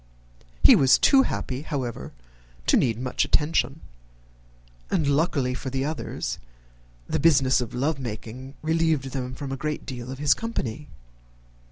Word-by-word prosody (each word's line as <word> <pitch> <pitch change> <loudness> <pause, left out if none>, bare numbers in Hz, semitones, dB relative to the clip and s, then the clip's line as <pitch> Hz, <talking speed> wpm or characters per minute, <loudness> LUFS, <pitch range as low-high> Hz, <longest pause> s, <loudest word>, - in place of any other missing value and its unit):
He - - +9
was 135 -1 +5
too 270 - +5
happy, 130 - -3
however, 135 -7 -4 0.5
to - - +4
need 115 -4 +2
much 125 0 0
attention; 150 -1 +1 1.1
and, 155 - +1
luckily 140 -3 +1
for 130 - -5
the 135 +1 -2
others, 155 +1 -4 0.7
the - - -1
business 135 -5 +4
of 120 - -5
love 140 +3 0
making 125 +3 -7
relieved 160 -4 +1
them 130 -1 -4
from 140 0 -6
a 135 - -3
great 150 -1 -3
deal 125 -2 -7
of 130 - -6
his 145 0 +4
company. 150 - -4
135 Hz, 145 wpm, -25 LUFS, 130-150 Hz, 1.1 s, He